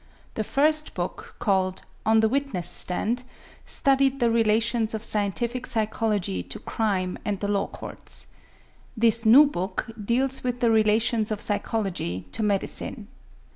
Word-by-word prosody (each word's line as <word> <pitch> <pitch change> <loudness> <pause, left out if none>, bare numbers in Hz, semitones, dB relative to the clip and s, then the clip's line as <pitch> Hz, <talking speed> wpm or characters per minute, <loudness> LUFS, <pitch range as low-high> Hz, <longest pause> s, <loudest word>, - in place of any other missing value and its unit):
The 220 - -2
first 305 +6 +1
book, - - -5
called 190 -3 0 0.2
"On 220 0 +5
the 220 - +4
Witness 250 -8 -2
Stand," 220 +8 0 0.4
studied 275 0 +2
the 235 -2 +3
relations 225 0 +1
of 215 - -5
scientific 230 +4 +1
psychology 215 - -1
to - - -8
crime 190 -5 -2
and 205 -4 -2
the 205 - -2
law 200 -1 0
courts. - - -8 0.7
This 230 0 +3
new 270 +7 +9
book 190 -4 -3
deals 260 +5 +1
with 245 -1 -2
the 235 -2 +3
relations 220 0 +2
of 215 -2 -2
psychology 195 - -2
to - - -3
medicine. 205 -2 -1
220 Hz, 135 wpm, -25 LUFS, 200-240 Hz, 0.7 s, new